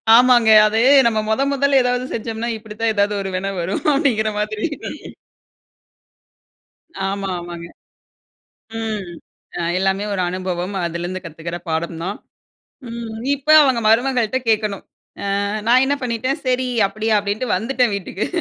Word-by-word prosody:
ஆமாங்க, 240 -2 +5 0.2
அது 220 +1 0 0.3
நம்ம 220 -2 +1
மொத, 220 +5 +1
மொதல்ல 280 0 +3
எதாவது 250 0 0
செஞ்சம்னா, 225 0 -4
இப்பிடி 215 -1 -11
தான் 225 -1 +2
எதாவது 205 0 +1
ஒரு 195 - -4
வினை 195 +2 -2
வரும் 175 +3 -2
அப்பிடிங்கிற 240 -7 +1
மாதிரி 215 +5 -2 2.4
ஆமா, 195 0 -3
ஆமாங்க. 170 -1 -8 1.1
ம், 215 -4 -4 0.5
அ, - - -3 0.2
எல்லாமே 195 +1 0
ஒரு 195 - -1
அனுபவம், 185 +1 -3
அதிலருந்து 175 +2 -4
கத்துக்கிற 170 +1 -6
பாடம் 165 +1 -2
தான். 200 +3 -3 0.7
ம், 230 -1 -6 0.2
இப்ப 280 +2 -10
அவுங்க 260 -4 +3
மருமகள்ட்ட 245 +1 +2
கேட்கணும், 215 -3 0 0.6
ஆ, - - -1 0.2
நான் 250 +2 +5
என்ன 280 +2 +1
பண்ணிட்டேன், 250 +2 -2
சரி 255 0 +1 0.2
அப்பிடியா! 215 +2 0
அப்பிடின்ட்டு 205 +3 -1
வந்துட்டேன் 245 +2 0
வீட்டுக்கு 195 0 -4
215 Hz, 130 wpm, -20 LUFS, 195-245 Hz, 2.4 s, ஆமாங்க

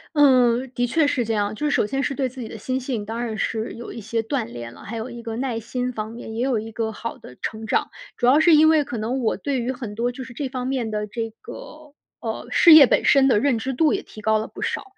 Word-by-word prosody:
嗯， 255 -3 +4
的 245 0 0
确 310 +6 +2
是 260 -4 +1
这 225 0 -2
样。 205 0 0
就 295 +8 -4
是 - - 0
首 - - +2
先 270 +5 -2
是 280 0 -2
对 265 0 0
自 255 +1 -9
己 230 - -5
的 225 - -8
心 255 +5 -2
性， 245 -5 -4
当 225 +3 -4
然 225 -2 -4
是 220 +2 -2
有 235 - -8
一 230 - -7
些 225 +2 -2
锻 255 +2 -1
炼 120 - -8
了。 - - -14
还 230 +3 -6
有 225 +3 -5
一 235 0 -8
个 225 -1 -5
耐 245 -3 -2
心 250 +2 -3
方 215 -1 -5
面， 230 -1 -8
也 230 +2 -1
有 260 -3 +1
一 220 +1 -7
个 220 0 -2
好 230 +2 -6
的 125 - -13
成 220 0 -4
长。 - - +1 0.3
主 - - 0
要 265 +5 +6
是 320 0 +6
因 310 +1 +6
为 315 -2 +4
可 245 -3 -6
能 230 +5 -2
我 225 - 0
对 280 -3 -2
于 240 +2 -1
很 240 -5 -6
多 235 +3 -1
就 260 +1 -8
是 255 -1 -11
这 265 +2 -4
方 255 -1 -4
面 255 -4 -1
的 210 -1 -2
这 225 +2 -4
个， 310 -11 -11 0.3
呃， - - -5
事 335 - +7
业 300 -4 +10
本 - - +2
身 275 -2 +5
的 245 -6 +4
认 250 -1 +1
知 265 +4 -3
度 305 +3 +3
也 - - -1
提 - - -14
高 220 0 +2
了 215 - -4
不 - - -8
少。 - - -2
240 Hz, 310 characters per minute, -23 LUFS, 220-265 Hz, 0.3 s, 业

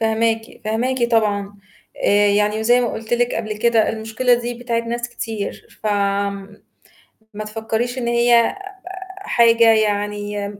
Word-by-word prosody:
فاهماكِ، 225 0 -1
فاهماكِ 240 +4 -1
طبعًا 205 -3 +1 0.5
آآ، 205 0 +4
يعني 210 +1 +1
وزي 240 +3 +4
ما 240 - -1
قُلت 220 +1 -7
لِك 245 0 0
قبل 215 -2 -3
كده 230 -1 +3
المشكلة 225 +3 +1
دي 240 0 -3
بتاعة 235 -1 -2
ناس 235 +1 -4
كتير 220 -4 -6
ف - - -3
آمم، 200 0 -2 0.7
ما 215 +1 -5
تفكّريش 225 +3 -3
إن 240 -2 -2
هي 235 +2 +3 0.6
حاجة 230 -10 +4
يعني 205 -1 -1
225 Hz, 135 wpm, -20 LUFS, 210-235 Hz, 0.7 s, آآ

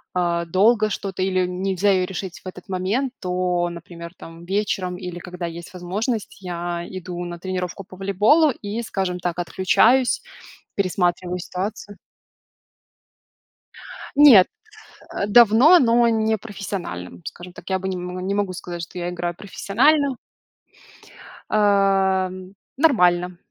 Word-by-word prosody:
а, 170 -1 0
долго 215 +5 +3
что-то 195 -2 -4
или 185 -1 +1
нельзя 190 +2 0
её 185 -1 +2
решить 190 -1 -6
в - - -10
этот 185 +1 -10
момент, 200 +8 -1
то, 180 -1 -1
например, 170 0 -10
там 165 +1 -12
вечером 190 -2 -1
или 180 -1 -7
когда 180 0 -7
есть 170 +1 -8
возможность, 200 +6 -3
я 175 -1 -4
иду 180 -1 -6
на 175 0 -6
тренировку 185 +1 -4
по 185 0 -14
волейболу 205 - +3
и, 220 -3 -4
скажем 190 -5 -3
так, 175 0 -3
отключаюсь, 220 +8 +2 0.5
пересматриваю 180 -2 0
ситуацию. 200 +3 -5 2.2
Нет, 265 -11 +8 0.7
э, 200 - -1
давно, 240 - +7
но 235 -3 +4
не 220 -1 +1
профессиональным, 190 - -7
скажем 180 +1 -9
так. - - -11
Я 190 - +1
бы 190 0 -4
не, 190 - -2
м, 180 0 -6
не 180 - -5
не 195 +1 -1
могу 190 -2 -5
сказать, 175 -1 -7
что 175 +2 -8
я 175 - -3
играю 175 -1 -3
профессионально. 265 - +1 1.3
Ам, 195 -2 +1 0.2
нормально. 180 - +3
185 Hz, 135 wpm, -22 LUFS, 180-205 Hz, 2.2 s, Нет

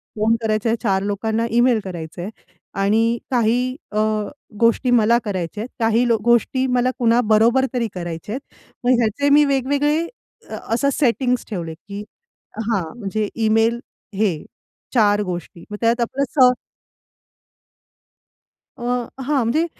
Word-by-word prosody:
Phone 220 +1 +2
करायचे 215 0 0
आहेत, 230 - +1
चार 195 -4 +1
लोकांना 220 +3 -1
ईमेल 240 0 +4
करायचंय, 175 0 -6 0.4
आणि 220 +4 +2
काही 240 0 +2 0.3
अ, 210 - -3 0.6
गोष्टी 235 +2 +3
मला 225 +2 +4
करायच्या 190 0 -3
आहेत, 245 - -8
काही 225 +1 +2 0.2
गोष्टी 240 +2 +3
मला 250 +1 +2
कुणाबरोबर 230 +1 +4
तरी 240 -2 0
करायचे 175 +2 -6
आहेत. 265 - -4 0.4
मग 250 - +4
ह्याचे 240 +5 +1
मी 295 +1 +6
वेगवेगळे 285 +4 +1 0.5
असं 245 +5 0
सेटिंग्स 250 -2 +1
ठेवले, 170 -6 -4
की 200 +5 -9 0.7
हां. 200 -5 +1 0.2
म्हणजे 210 0 -2
ईमेल 225 +1 +2 0.4
हे 190 -7 0 0.5
चार 210 -4 +4
गोष्टी, 175 -2 -6
मग 210 - -4
त्यात 235 +1 +2
आपलं 260 +4 -1 0.2
स 255 -1 +8 2.3
अ, - - -9 0.4
हां, 270 -2 +1
म्हणजे 310 +9 +1
230 Hz, 125 wpm, -21 LUFS, 205-245 Hz, 2.3 s, स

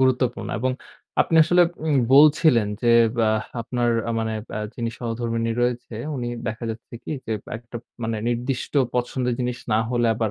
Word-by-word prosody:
গুরুত্বপূর্ণ। 130 -1 +1
এবং 130 +2 0 0.5
আপনি 165 - +2
আসলে 175 +1 +5 0.2
উম 150 -3 +2 0.2
বলছিলেন 145 -6 +6
যে, 120 - +2 0.4
আ - - +3 0.3
আপনার 120 +1 0 0.3
মানে 110 0 -1 0.4
যিনি 115 -1 -2
আ - - -14
সহধর্মিনী 115 -1 -2
রয়েছেন, 120 -2 -2
উনি 120 -1 -3 0.2
দেখা 115 +2 -4
যাচ্ছে 115 +1 -9
কি - - -7 0.2
যে 110 - -2 0.2
একটা 120 +1 -9 0.3
মানে 110 0 -1
নির্দিষ্ট 120 +2 -2 0.2
পছন্দের 125 0 0
জিনিস 125 0 -2
না 110 - +4
হলে, 120 -1 +2
আবার 110 -2 -1
120 Hz, 155 wpm, -23 LUFS, 115-125 Hz, 0.5 s, বলছিলেন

